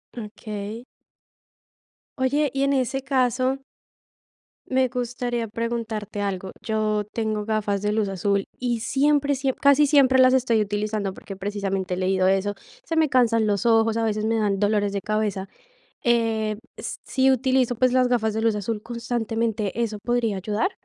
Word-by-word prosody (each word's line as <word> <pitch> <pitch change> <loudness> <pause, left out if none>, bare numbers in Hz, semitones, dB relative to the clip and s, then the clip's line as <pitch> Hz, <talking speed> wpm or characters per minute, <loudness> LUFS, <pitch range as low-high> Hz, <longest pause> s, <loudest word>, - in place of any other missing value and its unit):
Okey. 215 0 -7 1.4
Oye, 285 +3 +2
y 275 0 -1
en 280 0 +2
ese 265 0 0
caso 260 0 +1 1.1
me 260 -1 +2
gustaría 245 -1 -3
preguntarte 220 -2 -4
algo. 195 -2 -3
Yo 215 -1 0
tengo 215 -2 -2
gafas 210 -2 -1
de 210 0 0
luz 215 -2 0
azul 195 +1 0
y 240 -3 -1
siempre, 285 +3 +2
siem 265 0 -1
casi 280 +1 +4
siempre 265 -3 +5
las 255 0 +6
estoy 240 -4 +2
utilizando, 210 -1 -1
porque 195 0 -9
precisamente 195 -2 -2
he - - -2
leído 185 0 +1
eso, 195 +1 +1 0.3
se 330 -8 -3
me 315 -1 +4
cansan 230 -4 +3
los 205 +3 0
ojos, 225 -1 +4
a 230 - 0
veces 215 -1 0
me 225 +1 +1
dan 200 -2 0
dolores 205 -1 +1
de 200 -1 -3
cabeza. 210 -2 -1 0.6
Eh, 225 -3 +1 0.2
s - - -6
si 265 0 +2
utilizo, 255 -1 +2
pues, 255 +2 +2
las 255 -1 +4
gafas 220 -3 +1
de 220 - -1
luz 225 -1 +2
azul 210 +1 -3
constantemente, 230 -2 -2
¿eso 215 -2 -2
podría 235 -2 0
ayudar? 210 - -1
225 Hz, 160 wpm, -24 LUFS, 210-250 Hz, 1.4 s, las